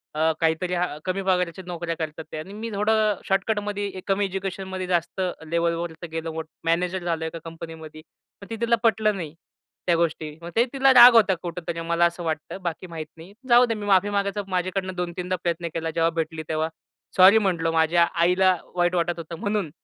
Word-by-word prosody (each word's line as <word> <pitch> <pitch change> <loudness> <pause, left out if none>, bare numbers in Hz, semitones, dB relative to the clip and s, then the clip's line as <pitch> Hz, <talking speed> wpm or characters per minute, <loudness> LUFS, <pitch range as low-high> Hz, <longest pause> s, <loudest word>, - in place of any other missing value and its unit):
अ, 160 +1 +3
काहीतरी 165 +2 0
अ, 175 -3 -1
कमी 185 +1 -1
पगाराच्या 180 -1 0
नोकऱ्या 170 -1 -3
करतात 155 0 -4
ते - - -5
आणि 185 +6 -8
मी 220 +2 -5
थोडं 210 -1 +1
शॉर्टकटमध्ये, 205 0 -1
कमी 200 +1 +1
एज्युकेशनमध्ये 190 -1 -4
जास्त 175 +1 -1 0.2
लेव्हलवर 170 +1 -1 0.2
गेलो, 160 0 -4 0.2
मॅनेजर 175 +2 0
झालो 165 -2 -1
एका 165 +1 -5
कंपनीमध्ये, 160 -1 -9 0.4
पण 200 - -10
ते 225 - -4
तिला 235 0 +3
पटलं 215 -2 +3
नाही, 160 -5 -6 0.5
त्या 175 - +4
गोष्टी. 160 -2 -2
मग 170 - -7
ते 230 - +5
तिला 270 0 +5
राग 245 0 +10
होता 210 -4 +6
कुठेतरी, 170 -1 -5
मला 170 +1 +2
असं 170 +1 -2
वाटतं. 160 +2 -3
बाकी 175 +1 -4
माहीत 165 -2 -6
नाही. 170 +5 -13 0.2
जाऊदे 240 -1 +6
मी 210 -2 -6
माफी 200 0 +3
मागायचं 200 0 -1
माझ्याकडनं 185 0 -2
2-3दा 180 +1 -3
प्रयत्न 170 0 -1
केला. 165 0 -2
जेव्हा 165 0 +3
भेटली, 160 0 -3
तेव्हा 160 0 0 0.5
सॉरी 190 +3 +8
म्हंटलो. 175 -6 +1
माझ्या 165 +1 +3
आईला 180 +2 +3 0.2
वाईट 175 0 +2
वाटत 175 0 0
होतं 165 0 -7
म्हणून. 205 -5 -1
180 Hz, 180 wpm, -24 LUFS, 165-195 Hz, 0.5 s, राग